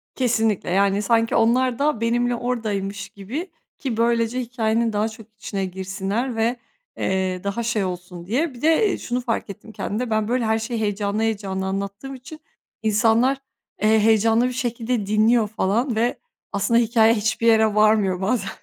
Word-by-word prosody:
Kesinlikle. 225 -7 +1
Yani 195 +2 +2
sanki 225 +2 +2
onlar 245 +2 +2
da 285 -6 +1
benimle 240 +1 +1
oradaymış 210 -5 -3
gibi 265 - -6 0.3
ki 250 -6 -3
böylece 235 +1 +1
hikâyenin 230 -2 0
daha 210 +2 0
çok 220 0 -13
içine 195 -2 -3
girsinler 195 +6 -3
ve, 225 +2 +1 0.4
eee, 185 -1 -1
daha 200 +4 -2
şey 225 -3 0
olsun 180 -1 -6
diye. 270 - -1
Bir 240 - -13
de, 325 +8 +4
eee, - - -1
şunu 245 +1 -3
fark 230 -3 -2
ettim 215 +2 -10
kendimde. 230 +3 -3
Ben, 215 -1 0
böyle, 245 0 0
her 220 0 +1
şeyi 230 +1 -3
heyecanlı 205 0 -1
heyecanlı 200 -4 -2
anlattığım 200 +7 -4
için 260 +5 -11 0.4
insanlar, 225 +5 +3 0.4
eee, 220 +1 +4
heyecanlı 225 +2 +3
bir - - -3
şekilde 240 -3 -2
dinliyor 215 +2 +3
falan 220 +4 0
ve 235 +3 0 0.3
aslında 210 +4 +2
hikâye 225 -1 +4
hiçbir 220 +1 0
yere 220 -2 +4
varmıyor 210 -3 +3
bazen. 195 0 0
225 Hz, 160 wpm, -22 LUFS, 205-240 Hz, 0.4 s, de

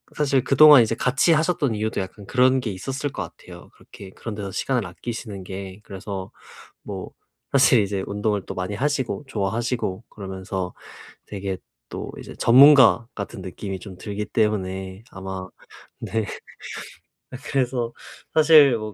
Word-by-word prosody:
사실 140 -3 +2
그동안 145 -1 +8
이제 115 +1 -1
같이 135 +6 +2
하셨던 155 -6 +1
이유도 110 -1 -1
약간 100 +2 -8
그런 130 +3 +4
게 115 -5 -3
있었을 135 +9 -4
것 - - -5 0.2
같아요. - - -13
그렇게 95 - -13
그런 115 +3 -7
데서 100 -2 -5
시간을 125 +3 -1
아끼시는 105 0 -7
게. 95 +1 -7
그래서 95 -1 -7 0.5
뭐 95 -2 -7 0.4
사실 130 -4 +6
이제 100 -1 -2
운동을 105 0 -1
또 - - -6
많이 90 +2 -3
하시고 130 -2 -1
좋아하시고 115 -1 -2
그러면서 95 -2 -5 0.5
되게 100 -2 -4 0.3
또 - - -6
이제 - - -9
전문가 130 -2 +7
같은 110 - -6
느낌이 95 +1 -6
좀 95 -3 -10
들기 105 +1 -4
때문에 95 -3 -1
아마 95 -1 -6 0.5
네. 110 -1 -2 1.1
아 130 - -6
그래서 125 -3 -1 0.5
사실 150 -6 +7
뭐 110 -1 -6
110 Hz, 305 characters per minute, -23 LUFS, 95-130 Hz, 1.1 s, 그동안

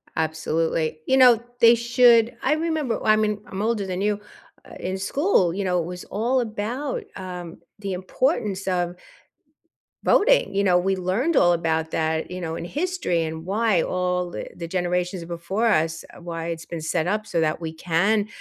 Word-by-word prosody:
Absolutely. 160 0 -1
You 265 - +3
know, 245 -3 +7 0.2
they 235 -1 +7
should 235 0 +4
I 275 - +3
remember 310 -5 -1
oh, - - -7
I 215 - +6
mean, 210 -1 0
I'm 190 - -5
older 215 -2 0
than 185 0 -3
you 205 0 0 0.5
uh, - - -11
in 190 - -3
school, 195 - +1
you 200 +2 -2
know, 180 -1 +1
it 165 - -2
was 180 +1 -7
all 240 +5 0
about, 235 +5 -3
um, 180 -3 -7 0.2
the 200 -2 -4
importance 195 - -1
of 175 -2 0 1.1
voting. 430 - +3
You 200 - +2
know, 180 -2 +4
we 190 +2 +1
learned 195 - 0
all 175 - +5
about 160 -1 0
that, 160 +1 -1
you 180 - -5
know, 165 -2 -4
in - - -5
history 290 - -1
and 160 0 -5
why 205 -1 +2
all, 180 0 -1
eh, - - -4
the 170 - -6
generations 180 0 -1
before 175 +7 -2
us, 160 -5 +1 0.2
why 165 -1 -5
it's 165 -1 -5
been 170 - -6
set 160 +1 -1
up 210 +2 -1
so 170 -4 0
that 155 -1 0
we 160 -2 -5
can 195 +6 +1
185 Hz, 185 wpm, -24 LUFS, 170-225 Hz, 1.1 s, know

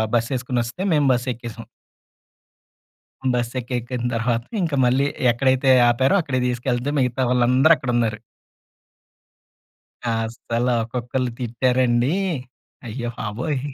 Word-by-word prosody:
బస్సేసుకొని 125 +1 -1
వస్తే 120 +10 -7
మేము 150 -2 +3
బస్సెక్కేసాం. 120 -2 -3 1.7
బస్సెక్కెక్కిన 120 0 -3
తర్వాత 115 0 0 0.2
ఇంకా 160 -5 0
మళ్ళీ 130 +3 +2 0.2
ఎక్కడైతే 130 +2 +2 0.2
ఆపారో 130 +9 +3
అక్కడికి 130 -5 -1
తీసుకెళ్తే 125 +2 -1
మిగతా 125 0 0
వాళ్ళందరూ 125 +5 +4
అక్కడున్నారు. 120 -4 -1 1.9
అస్సల 115 +1 -2 0.2
ఒక్కొక్కళ్ళు 125 +2 -3
తిట్టారండి. 125 +2 +1 0.7
అయ్యో 120 +1 -4
బాబోయ్! 125 +7 -3
125 Hz, 85 wpm, -22 LUFS, 120-130 Hz, 1.9 s, వాళ్ళందరూ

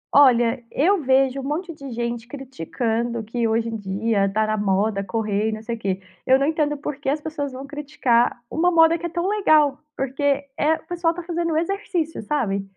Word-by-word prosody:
Olha, 245 -3 +5
eu 365 +6 +2
vejo 265 0 +3
um 270 - -5
monte 330 +5 -3
de 275 -2 -9
gente 235 0 -3
criticando 235 - -3
que 230 +1 -1
hoje 225 +1 0
em 225 - -4
dia, 200 0 0
tá 215 +1 +1
na 215 0 0
moda, 200 0 +1
correr 210 +1 -1
e - - -2
não 215 0 -6
sei 235 +1 -3
o 230 - -12
quê. 195 -2 -2 0.2
Eu 260 +1 +5
não 275 - +1
entendo 300 -1 +1
o - - -5
por 285 0 -5
que 275 -2 -3
as 295 +2 0
pessoas 295 -2 -4
vão 260 +2 -7
criticar 275 -5 +1
uma 345 +6 +2
moda 330 -1 +5
que 345 +1 -3
é - - -8
tão 345 +2 -2
legal. 310 -9 +3 0.2
Porque 270 +2 -3 0.3
é 310 +2 +2
o - - -14
pessoal 340 -1 0
tá 350 - -6
fazendo 335 -2 -1
exercício, 345 - -2
sabe. 205 -6 -1
270 Hz, 210 wpm, -23 LUFS, 225-315 Hz, 0.3 s, Olha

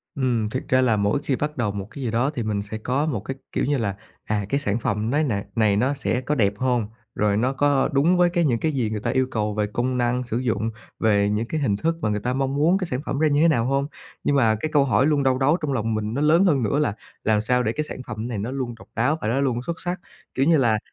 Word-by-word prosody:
Ừm, 120 -5 0
thiệt 130 - -3
ra 130 0 +3
là 115 -4 +3
mỗi 100 +7 +1
khi 135 -3 0
bắt 150 +1 -3
đầu 105 -4 0
một 100 0 -5
cái 140 - -7
gì 115 - -1
đó 120 +5 +1
thì 120 - -2
mình 105 -2 -1
sẽ 105 +2 -6
có 130 +7 -1
một 130 -10 -1
cái, 135 +6 -5 0.2
kiểu - - 0
như 145 0 +1
là 100 -4 -1 0.3
"À, 105 -2 -1
cái 140 - +1
sản 110 -4 0
phẩm 105 +1 -1
nay 150 +4 +2
này 105 -8 -1
này 105 -3 +3
nó 130 +6 +2
sẽ 130 -2 -1
có 150 +3 -1
đẹp 100 -5 +2
hông? 125 -4 0 0.3
Rồi 105 -1 +1
nó 130 +4 +1
có - - -20
có 140 -2 +3
đúng 165 +6 +3
với 175 -1 +4
cái 175 -2 +1
những 120 -5 +1
cái 160 - 0
gì 125 -6 -1
người 110 -1 -3
ta - - -2
yêu 130 0 +1
cầu 105 -2 -1
về 105 -1 0
công 125 +4 -1
năng 125 +1 0
sử 120 -1 -3
dụng, 115 -3 -1 0.3
về 100 -2 +3
những 110 +3 -1
cái 155 -2 -2
hình 105 -7 +1
thức 165 +7 0
mà 105 - 0
người 105 0 0
ta 125 +4 -2
mong 135 +1 -1
muốn 165 +6 +3
cái 185 - -2
sản 125 -3 -2
phẩm 140 - -2
ra 155 - +4
như 145 +1 +2
thế 165 - +6
nào 120 -7 +2
hông?" 140 +2 0 0.4
Nhưng 145 - +2
mà 115 -5 +4
cái 155 - -2
câu 140 -2 +4
hỏi 130 +1 +3
luôn 145 -2 +2
đau 130 -1 +2
đáu 145 +6 +3
trong 145 -3 -1
lòng 115 -2 -1
mình 110 +1 -2
nó 140 - -1
lớn 165 +5 +5
hơn 140 -9 +3
nữa 140 +7 +1
là 145 -9 +1 0.3
"Làm 105 -1 +2
sao 125 +2 +2
để 110 - 0
cái 155 - -2
sản 150 - -7
phẩm 110 +1 -4
này 115 -4 -4
nó 110 +6 -3
luôn 125 -3 -3
độc - - -14
đáo 135 +8 +1
và - - -2
nó 130 +5 +1
luôn 125 -3 0
xuất 170 +2 -4
sắc?" 175 +1 -2 0.3
Kiểu 135 - +1
như 165 -1 +5
là, 115 -5 +2
125 Hz, 300 wpm, -23 LUFS, 110-140 Hz, 0.4 s, thế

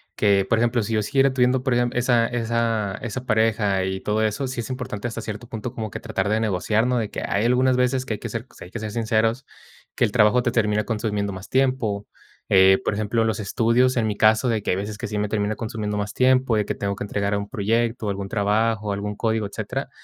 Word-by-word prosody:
que 100 -2 +3
por 115 - +2
ejemplo, 120 -1 +1
si 115 - -3
yo 110 - +2
siguiera 135 +4 +2
teniendo 125 0 +2
perdem 120 -2 +2
esa 120 -1 +2
esa 115 -3 -1
esa 120 +3 -5
pareja 105 -4 +2
y 95 0 -2
todo 110 +1 0
eso, 110 +5 -1
sí 125 -2 -3
es 115 - -8
importante 120 -3 -4
hasta 115 -1 -5
cierto 110 +2 -7
punto 115 +2 -5
como 110 -2 -4
que - - -5
tratar 110 -2 -2
de 110 - +2
negociar, 110 +3 +1
¿no?, 125 -1 +1
de 105 -2 -2
que - - -4
hay 100 +3 0
algunas 125 +1 +3
veces 125 +1 +1
que 115 - -2
hay - - -11
que 120 - -6
ser 115 +3 -5
sí - - -10
hay 90 - -14
que 120 - -5
ser 105 -1 -5
sinceros. 115 +2 0 0.5
Que - - +3
el 105 - -2
trabajo 115 +1 +4
te 120 - +1
termina 105 -3 +1
consumiendo 105 -3 -2
más 95 +1 -9
tiempo, 130 -6 0 0.4
eh, 95 0 +6
por 100 - 0
ejemplo, 110 +2 0
los 110 0 -1
estudios, 115 +5 +2
en 110 -2 +2
mi 105 -1 -2
caso, 110 +3 +4
de 110 -3 0
que - - 0
hay - - +2
veces 105 +1 -4
que - - -5
sí 105 0 -4
me 105 0 -1
termina 105 0 -1
consumiendo 110 -2 -4
más 105 0 -3
tiempo, 130 -2 +3
de 105 - +1
que - - -2
tengo 100 0 -2
que - - -5
entregar 100 0 -1
algún 100 0 -2
proyecto, 115 +1 0
algún 100 0 -3
trabajo, 105 0 0
algún 105 +1 -4
código, 110 -1 0
etcétera. - - -5
110 Hz, 240 wpm, -23 LUFS, 105-120 Hz, 0.5 s, eh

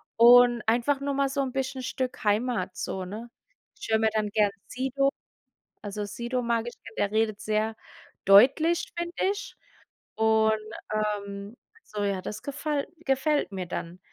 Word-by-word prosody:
und 240 0 +7
einfach 245 +5 +2
nur 280 0 -2
mal 275 -1 +1
so 275 +1 -1
'n 260 -2 -2
bisschen 265 0 -3
Stück 255 -1 -4
Heimat 210 -3 0
so, 190 -1 -3
ne? 225 +5 -8 0.5
Ich - - -7
höre 220 - +4
mir 220 0 +3
dann 215 -1 0
gern 205 -1 +2 0.2
Sido 270 +2 0 0.7
also, 205 0 -4
Sido 240 +4 -3
mag 235 -1 0
ich, 240 - -6
denn 230 0 -13
der 200 - +1
redet 215 -1 +1
sehr 215 +1 -1 0.5
deutlich, 275 - +5
finde 345 +1 -3 0.2
ich. 405 0 -8 0.6
Und, 220 0 +3 0.4
ähm 205 0 -3 0.4
so 205 -1 -2
ja, 195 -2 -1
das 215 +3 -6
gefall 290 0 -2
gefällt 285 -3 +1
mir 185 -2 -4
dann. 175 +1 -6
230 Hz, 155 wpm, -27 LUFS, 210-270 Hz, 0.7 s, und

